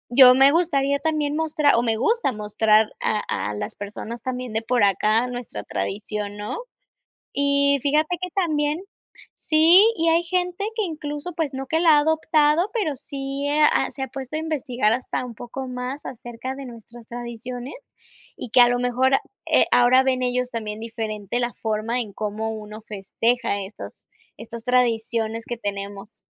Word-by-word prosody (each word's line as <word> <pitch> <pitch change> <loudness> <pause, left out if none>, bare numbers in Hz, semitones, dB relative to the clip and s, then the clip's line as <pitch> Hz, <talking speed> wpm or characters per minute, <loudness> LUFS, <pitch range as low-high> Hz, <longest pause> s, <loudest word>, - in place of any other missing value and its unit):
yo 255 -1 +9
me 270 +1 +6
gustaría 280 -4 +1
también 300 -1 -1
mostrar 310 -2 +2
o 235 - +3
me 225 -2 0
gusta 450 - +1
mostrar 215 0 +2
a 210 -1 +1 0.3
a - - -5
las 105 - -5
personas 215 +3 -7
también 250 -2 -4
de 220 - 0
por 245 -2 +1
acá 215 +4 +3
nuestra 245 -1 -6
tradición, 205 0 -4
¿no? 210 - -5 0.8
Y 280 0 +3
fíjate 305 +4 +1
que 365 - -3
también 310 -3 0 0.5
sí 325 +5 +6
y 330 0 +1
hay 335 +1 +4
gente 360 +2 -1
que 440 - +1
incluso 300 0 -5
pues, 310 -5 -2
no 270 0 -4
que 320 +4 0
la 335 - +5
ha - - +5
adoptado, 315 +2 +2
pero 325 -11 0
sí 275 0 -4
ha 300 +1 +3
se 270 - -7
ha 265 - -3
puesto 265 +3 -6
a - - -1
investigar 255 -8 0
hasta 250 +1 -2
un 240 -2 -8
poco 250 +4 -7
más 250 +3 -5
acerca 240 +2 -7
de 275 - -8
nuestras 235 -1 -12
tradiciones 240 +2 -7 0.6
y 240 - -7
que 250 - +6
a 240 - +8
lo 245 - +1
mejor, 250 +2 +1 0.3
eh, - - +4
ahora 250 +2 +6
ven 255 -1 +1
ellos 250 0 0
también 215 -3 -5
diferente 225 -1 -4
la 240 0 -2
forma 220 +2 -2
en 215 -4 -5
cómo 215 +1 -3
uno 215 0 -9
festeja 215 +1 -1
estos 195 +2 -10 0.3
estas 230 0 -9
tradiciones 230 -2 0
que 240 - -4
tenemos. 200 0 -6
250 Hz, 170 wpm, -23 LUFS, 225-290 Hz, 0.8 s, yo